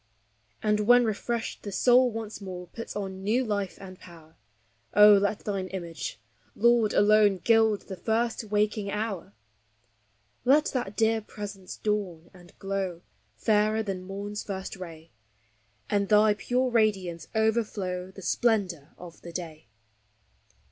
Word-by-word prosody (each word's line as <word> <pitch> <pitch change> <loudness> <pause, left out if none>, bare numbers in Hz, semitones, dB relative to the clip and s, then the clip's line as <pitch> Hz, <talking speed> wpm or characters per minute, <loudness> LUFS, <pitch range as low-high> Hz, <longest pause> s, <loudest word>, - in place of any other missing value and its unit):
And 210 0 +2
when 245 +3 +5
refreshed 225 +2 -3
the 205 - -6
soul 250 +5 +4
once 220 -2 -6
more 180 -2 -7
puts 230 +6 -8
on 190 -2 -5
new 235 +6 +1
life 200 -4 -2
and 185 -1 -11
power; 165 -3 -15 0.6
Oh, 210 0 +9
let 205 +1 +2
thine 195 -3 -2
image, 170 -4 -6 0.4
Lord, 235 -1 +4
alone, 205 -1 +4
gild 220 +1 +3
the 190 - -7
first 225 +3 -1
waking 210 0 0
hour! 200 - -4 1.1
Let 290 +4 +4
that 240 -6 -3
dear 225 0 +2
Presence 205 -3 -8
dawn 190 -6 -3
and 175 -1 -17
glow, 195 -3 -3 0.3
fairer 215 0 +2
than 195 -3 -4
morn's 200 +2 -5
first 190 -1 -5
ray, 165 -3 -10 0.8
And 200 -1 0
thy 210 0 +5
pure 250 +4 -1
radiance 190 -8 0
overflow 210 -5 0
the 190 0 -12
splendor 185 - 0
of 175 -2 -12
the 170 - -9
day. 160 -6 -7
205 Hz, 135 wpm, -27 LUFS, 185-220 Hz, 1.1 s, Oh